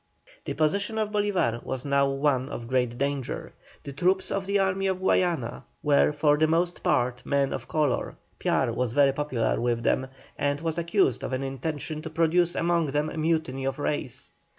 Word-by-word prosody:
The - - -3
position 200 +8 0
of 215 -1 -1
Bolívar 200 - 0
was 130 0 -4
now 140 -1 +3
one 135 -1 +1
of 120 -4 -6
great 125 -1 0
danger; 140 -1 -3 0.3
the 140 - -7
troops 185 +5 +1
of 195 -1 -2
the 200 0 +2
army 195 0 +1
of 190 -1 0
Guayana 175 -9 0 0.2
were 145 0 +4
for 150 0 +3
the 155 - +4
most 170 +2 0
part 125 0 +1
men 140 -1 +1
of - - -5
colour, 150 -5 0 0.2
Piar - - +1
was 125 -2 -1
very 140 -1 +4
popular 130 -7 -1
with 120 -1 0
them, 130 +3 +1 0.3
and 145 0 0
was 165 +1 -2
accused 170 - +1
of - - -3
an 130 +1 -1
intention 145 +3 -4
to 160 - -6
produce 165 +2 +2
among 170 -1 +1
them 150 +2 -1
a - - -7
mutiny 155 -4 0
of 135 0 -1
race. 145 -4 -3
145 Hz, 185 wpm, -27 LUFS, 130-170 Hz, 0.3 s, were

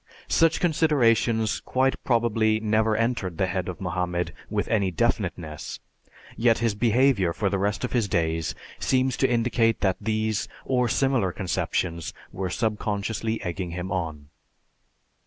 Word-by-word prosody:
Such 165 0 +3
considerations 120 -9 +2
quite 130 +1 0
probably 115 -3 +2
never 110 0 +2
entered 115 -7 -1
the 95 - +2
head 95 -1 -2
of 90 - -6
Mohammed 90 -1 -2 0.2
with - - -1
any 100 -3 +2
definiteness; 80 -2 -2 0.6
yet 115 -1 +3
his 115 -2 +1
behavior 115 -4 +3
for 100 0 -1
the 100 - 0
rest 100 +3 -1
of 125 - -2
his 115 -4 +1
days 80 -3 0 0.2
seems 130 -1 +1
to 135 - +2
indicate 115 -1 +2
that 95 -2 +2
these, 110 0 -1 0.2
or 125 -2 +1
similar 130 -9 +2
conceptions, 85 -3 -2 0.2
were 95 -1 -3
subconsciously 110 +2 -2
egging 90 +1 -3
him 90 +1 -4
on. 80 -6 -3
110 Hz, 140 wpm, -25 LUFS, 90-120 Hz, 0.6 s, Such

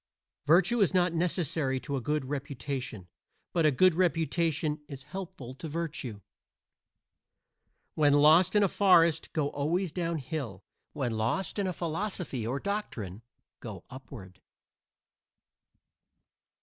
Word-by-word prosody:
Virtue 190 +9 +4
is 190 -1 +3
not 180 -2 +3
necessary 160 -5 0
to 140 +1 -4
a 135 - -2
good 150 +2 -1
reputation, 135 -6 -5 0.5
but 165 -3 +3
a - - +6
good 185 +7 +5
reputation 165 -3 0
is 140 -2 -8
helpful 150 -6 -7
to 140 +5 -8
virtue. 150 -9 -4 1.7
When 145 -2 +4
lost 160 +6 +6
in 210 - +5
a - - +5
forest 170 -5 +4
go 150 -3 0
always 165 +5 -1
down 170 -1 -2
hill. 130 - -5 0.3
When 135 -5 -2
lost 115 - -1
in 200 - 0
a - - 0
philosophy 170 - -3
or 130 +4 -1
doctrine 115 - -4 0.4
go - - -8
up 130 +1 -10
ward. 95 -8 -11
155 Hz, 125 wpm, -29 LUFS, 130-175 Hz, 1.7 s, a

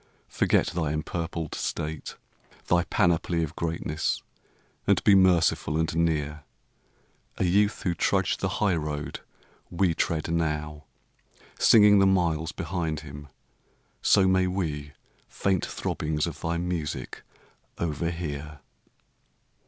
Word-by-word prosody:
Forget - - +2
thy 80 -4 -2
empurpled 80 +1 -4
state, 75 0 -4 0.5
thy 85 0 +2
panoply 85 -2 +1
Of 80 0 -5
greatness, 80 -2 -2 0.6
and - - +3
be 105 - +6
merciful 85 -5 +3
and 80 -1 -1
near; 75 -2 0 0.9
A - - 0
youth 100 +4 +2
who 90 - +1
trudged - - +1
the - - 0
highroad 75 -7 -1 0.5
we 85 -1 +1
tread 80 -1 -1
now 75 -2 -2 0.7
Singing 105 -2 +7
the 95 - +5
miles 85 -4 +1
behind 85 -3 -3
him; 75 -1 -10 0.7
so 95 - +4
may 95 0 +3
we 75 -6 -3 0.4
Faint 95 -3 0
throbbings 75 -1 -2
of - - -7
thy 85 +1 -1
music 85 -3 -4 0.6
overhear. 80 -3 -4
80 Hz, 110 wpm, -27 LUFS, 75-90 Hz, 0.9 s, Singing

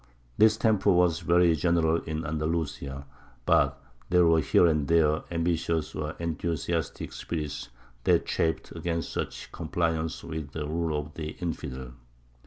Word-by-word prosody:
This 110 0 +5
temper 110 -3 +2
was 90 -2 +3
very 85 0 +4
general 80 +1 +2
in 80 0 -3
Andalusia, 75 -3 -3 0.4
but 70 0 +3 0.3
there 90 -1 +5
were 80 -1 +5
here 90 - +4
and 75 -4 +2
there 80 -2 +3
ambitious 85 -1 -1
or 75 +1 -4
enthusiastic 85 -1 -2
spirits 75 -4 -4 0.4
that - - +4
chafed 80 -1 -1
against 85 -2 -3
such - - -4
compliance 80 -1 -2
with 80 -2 -6
the 75 -2 -3
rule 80 0 -1
of 75 0 -7
the 80 -1 -5
"infidel." 65 -7 -5
80 Hz, 135 wpm, -28 LUFS, 75-85 Hz, 0.4 s, This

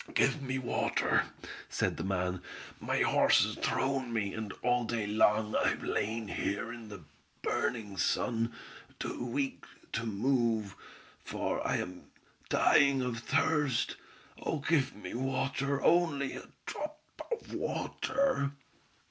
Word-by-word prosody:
"Give 140 +2 +3
me 130 -1 -2
water!" 130 -2 +1 0.4
said - - 0
the 85 - -3
man. 90 -1 -1 0.4
"My - - +1
horse - - +5
has - - -3
thrown 135 -2 0
me, 105 -4 0
and 110 -2 -4
all 125 0 +3
day 115 -2 -1
long 105 +1 +3
I - - +3
have - - 0
lain 110 +1 -1
here 105 +4 -2
in 115 -2 -9
the 100 -5 -9 0.4
burning 110 -4 -1
sun, 115 +2 +1 0.5
too - - -3
weak 135 +3 -2 0.3
to 115 0 -2
move, 115 -2 +1 0.5
for - - -2
I - - +2
am 90 0 -5 0.4
dying 140 -2 +5
of 120 -2 -2
thirst! 145 0 +1 0.5
Oh 160 - -1
give 140 -2 +1
me 105 - -7
water, 135 +2 0
only 160 -6 +3
a - - -8 0.2
drop 305 +1 -5 0.3
of 470 - -4
water!" 260 - 0
120 Hz, 130 wpm, -32 LUFS, 110-140 Hz, 0.5 s, horse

